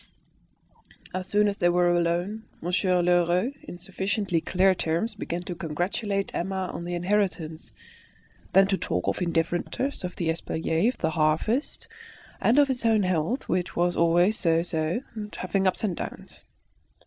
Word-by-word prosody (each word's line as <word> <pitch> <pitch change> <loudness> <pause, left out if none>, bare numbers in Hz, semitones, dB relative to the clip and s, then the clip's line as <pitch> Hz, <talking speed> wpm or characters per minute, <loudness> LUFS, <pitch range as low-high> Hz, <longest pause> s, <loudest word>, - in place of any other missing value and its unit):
As 185 0 -3
soon 210 0 +3
as 200 0 -1
they 175 - +3
were 175 0 +3
alone, 175 +6 -1
Monsieur 180 +1 +1
Lheureux 175 +7 +2
in 175 - -9
sufficiently 190 0 -1
clear 190 +3 +3
terms 175 +6 -1
began 175 -4 -4
to 175 - -5
congratulate 190 +5 -2
Emma 190 +1 -2
on 170 - -5
the 175 0 -3
inheritance, 175 -3 -1 0.8
then 195 0 +7
to 195 -1 0
talk 90 0 -2
of - - -1
indifferent 170 0 0
matters, 275 -4 -3
of 180 - -4
the 170 -2 -1
espaliers, 165 +7 0
of - - -23
the 160 - +1
harvest, 160 - 0 0.5
and 235 - +3
of 290 -1 +6
his 260 -3 -2
own 220 -3 +3
health, 185 - -1
which 180 -1 -1
was 175 0 +1
always 175 +6 +3
so 165 -1 +2
so, 165 +4 -1
always 210 -1 -5
having 195 -1 0
ups 185 - 0
and 190 -6 -1
downs. - - -8
180 Hz, 160 wpm, -26 LUFS, 170-200 Hz, 0.8 s, then